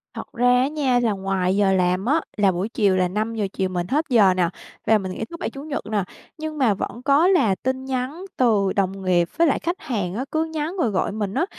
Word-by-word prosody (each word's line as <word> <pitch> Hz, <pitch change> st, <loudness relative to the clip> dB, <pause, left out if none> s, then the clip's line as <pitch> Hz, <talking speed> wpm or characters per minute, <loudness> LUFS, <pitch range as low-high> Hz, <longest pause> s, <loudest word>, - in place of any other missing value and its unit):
Thật -, -, -8 dB
ra 245 Hz, 0 st, +1 dB
á 265 Hz, -, +2 dB
nha 275 Hz, -5 st, +1 dB
là 230 Hz, -3 st, +1 dB
ngoài 190 Hz, -1 st, -1 dB
giờ 200 Hz, -1 st, +3 dB
làm 185 Hz, +2 st, +1 dB
á 310 Hz, +5 st, +2 dB, 0.2 s
là 200 Hz, -2 st, +4 dB
buổi 185 Hz, +5 st, -3 dB
chiều 200 Hz, -5 st, +2 dB
là 185 Hz, -1 st, +2 dB
5:00 215 Hz, +2 st, -2 dB
chiều 190 Hz, -1 st, -1 dB
mình 180 Hz, -1 st, -3 dB
hết 305 Hz, +6 st, 0 dB
giờ 205 Hz, -7 st, +5 dB
nè 175 Hz, -2 st, +1 dB, 0.4 s
và 220 Hz, -, +5 dB
mình 190 Hz, -2 st, -5 dB
nghỉ 220 Hz, -, -4 dB
thứ 335 Hz, +9 st, -9 dB
Bảy, -, -, -2 dB
Chủ 275 Hz, -, -9 dB
nhật 295 Hz, -2 st, -4 dB
nè, 205 Hz, -3 st, +1 dB, 0.3 s
nhưng 310 Hz, 0 st, -5 dB
mà 245 Hz, -7 st, +3 dB
vẫn 225 Hz, +4 st, -5 dB
có 295 Hz, +5 st, +4 dB
là 230 Hz, -, +3 dB
tin 260 Hz, +5 st, -3 dB
nhắn 265 Hz, +7 st, -3 dB
từ 210 Hz, -6 st, +2 dB
đồng 195 Hz, -1 st, -1 dB
nghiệp 175 Hz, -2 st, +2 dB
với 335 Hz, -, +4 dB
lại 280 Hz, -, +1 dB
khách 345 Hz, +2 st, -3 dB
hàng 200 Hz, -8 st, -3 dB
á, 255 Hz, -, -3 dB
cứ 315 Hz, +1 st, +1 dB
nhắn 320 Hz, +3 st, -4 dB
rồi 245 Hz, -10 st, +1 dB
gọi 195 Hz, 0 st, -1 dB
mình 205 Hz, -2 st, -3 dB
á. 345 Hz, -, +1 dB
220 Hz, 250 wpm, -22 LUFS, 190-275 Hz, 0.4 s, giờ